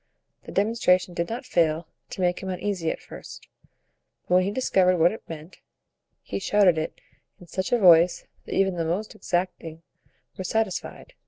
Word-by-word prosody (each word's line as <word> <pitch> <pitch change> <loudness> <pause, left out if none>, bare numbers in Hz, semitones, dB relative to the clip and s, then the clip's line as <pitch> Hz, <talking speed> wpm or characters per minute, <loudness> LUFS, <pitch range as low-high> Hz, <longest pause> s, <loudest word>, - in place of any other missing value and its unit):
The - - -9
demonstration 195 -4 +2
did 170 0 -2
not 235 +3 -5
fail 165 -7 +1 0.2
to - - -6
make 180 0 +1
him 190 - -5
uneasy 185 -2 -2
at - - -3
first; - - -11 0.8
but - - 0
when 185 0 +5
he - - 0
discovered 190 -5 +2
what 170 +1 +4
it 220 - -8
meant, 165 +2 -9 0.6
he 100 - -4
shouted 185 - +3
it 155 - -5 0.4
in 180 - -13
such 185 +2 -4
a 245 - +4
voice 175 -4 +5 0.2
that - - -4
even 190 -2 +2
the 165 - 0
most 185 +7 -2
exacting 170 -2 -3 0.6
were - - -2
satisfied. 220 - -3
180 Hz, 170 wpm, -25 LUFS, 170-200 Hz, 0.8 s, when